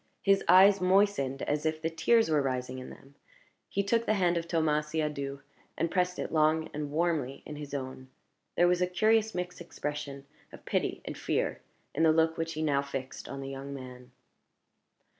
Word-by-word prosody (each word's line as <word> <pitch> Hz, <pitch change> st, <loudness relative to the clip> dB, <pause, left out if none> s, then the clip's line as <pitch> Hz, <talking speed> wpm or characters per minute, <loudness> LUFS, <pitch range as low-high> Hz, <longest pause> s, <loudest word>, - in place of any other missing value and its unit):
His 195 Hz, 0 st, +4 dB
eyes 190 Hz, +2 st, +7 dB
moistened 180 Hz, -8 st, +2 dB
as 145 Hz, 0 st, -1 dB
if 155 Hz, 0 st, -1 dB
the 160 Hz, +1 st, -1 dB
tears 225 Hz, +7 st, +3 dB
were 155 Hz, -2 st, +2 dB
rising 130 Hz, -1 st, -2 dB
in 130 Hz, -, -8 dB
them; 135 Hz, +1 st, -15 dB, 0.6 s
he 200 Hz, -, 0 dB
took 230 Hz, +3 st, +1 dB
the 215 Hz, -, +3 dB
hand 180 Hz, -3 st, +2 dB
of 170 Hz, 0 st, -2 dB
Thomas 155 Hz, -3 st, +1 dB
Siadoux, 150 Hz, -3 st, -3 dB, 0.4 s
and 165 Hz, -, 0 dB
pressed 180 Hz, -1 st, 0 dB
it -, -, -4 dB
long 155 Hz, 0 st, +2 dB
and 150 Hz, -1 st, -4 dB
warmly 155 Hz, -4 st, -1 dB
in 150 Hz, -, -7 dB
his 145 Hz, -1 st, -6 dB
own. 130 Hz, -1 st, -6 dB, 0.5 s
There 175 Hz, -, +5 dB
was 180 Hz, 0 st, +2 dB
a 180 Hz, -, +3 dB
curious 220 Hz, +4 st, +2 dB
mixed 180 Hz, -1 st, -4 dB
expression 150 Hz, -4 st, -5 dB, 0.3 s
of -, -, -13 dB
pity -, -, -1 dB
and -, -, -5 dB
fear -, -, -1 dB, 0.3 s
in 155 Hz, -, -1 dB
the 160 Hz, -1 st, +6 dB
look 160 Hz, 0 st, +3 dB
which 165 Hz, 0 st, -3 dB
he 155 Hz, 0 st, -3 dB
now 140 Hz, -3 st, +2 dB
fixed 135 Hz, -1 st, -6 dB
on 140 Hz, 0 st, -6 dB
the 135 Hz, -, -6 dB
young 135 Hz, +1 st, -6 dB
man. 125 Hz, -1 st, -10 dB
155 Hz, 190 wpm, -30 LUFS, 140-180 Hz, 0.6 s, eyes